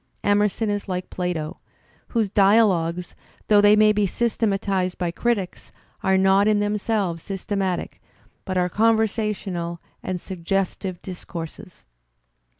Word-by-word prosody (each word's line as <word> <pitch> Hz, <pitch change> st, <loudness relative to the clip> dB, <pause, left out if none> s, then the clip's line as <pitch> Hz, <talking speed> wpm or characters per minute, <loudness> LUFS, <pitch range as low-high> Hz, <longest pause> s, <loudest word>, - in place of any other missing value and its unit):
Emerson 205 Hz, +2 st, +2 dB
is 205 Hz, 0 st, -2 dB
like 180 Hz, 0 st, -4 dB
Plato, 175 Hz, -4 st, -3 dB, 0.5 s
whose 225 Hz, -3 st, 0 dB
dialogues, 195 Hz, -4 st, +3 dB, 0.4 s
though 205 Hz, -1 st, +6 dB
they 205 Hz, +1 st, +6 dB
may 215 Hz, 0 st, +5 dB
be 210 Hz, -1 st, +2 dB
systematized 195 Hz, -4 st, 0 dB
by 175 Hz, -1 st, -1 dB
critics, 200 Hz, -1 st, -2 dB, 0.3 s
are 190 Hz, 0 st, +3 dB
not 195 Hz, +2 st, +4 dB
in 210 Hz, -1 st, +3 dB
themselves 205 Hz, -4 st, -1 dB
systematic, 195 Hz, -1 st, -3 dB, 0.4 s
but 185 Hz, -2 st, -3 dB
are 180 Hz, 0 st, +2 dB
conversational 210 Hz, -5 st, 0 dB, 0.2 s
and 185 Hz, -1 st, -3 dB
suggestive 185 Hz, 0 st, -3 dB
discourses. 180 Hz, +1 st, -8 dB
195 Hz, 115 wpm, -23 LUFS, 180-210 Hz, 0.5 s, though